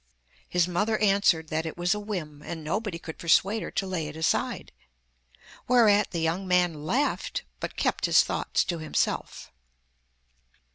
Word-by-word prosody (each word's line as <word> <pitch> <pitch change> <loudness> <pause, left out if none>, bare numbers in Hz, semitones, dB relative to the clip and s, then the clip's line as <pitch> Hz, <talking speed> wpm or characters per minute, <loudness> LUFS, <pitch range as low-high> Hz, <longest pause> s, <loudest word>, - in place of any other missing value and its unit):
His 180 -1 +2
mother 205 +5 0
answered 195 -6 +2
that 160 +1 -1
it 160 - -7
was 175 +2 +1
a 210 - -3
whim, 170 -9 -5
and 160 -1 -6
nobody 195 +3 -2
could 160 -1 -9
persuade 195 +6 +3
her - - -5
to 195 - -2
lay 180 -5 -3
it 150 - -8
aside; 160 0 -1 1.0
whereat 220 -4 +4
the 170 - -3
young 170 +4 -1
man 175 -4 +1
laughed, 275 - -1 0.2
but - - -5
kept - - 0
his - - +6
thoughts - - 0
to 170 -2 -3
himself. 155 -1 -2
180 Hz, 155 wpm, -27 LUFS, 160-205 Hz, 1.0 s, his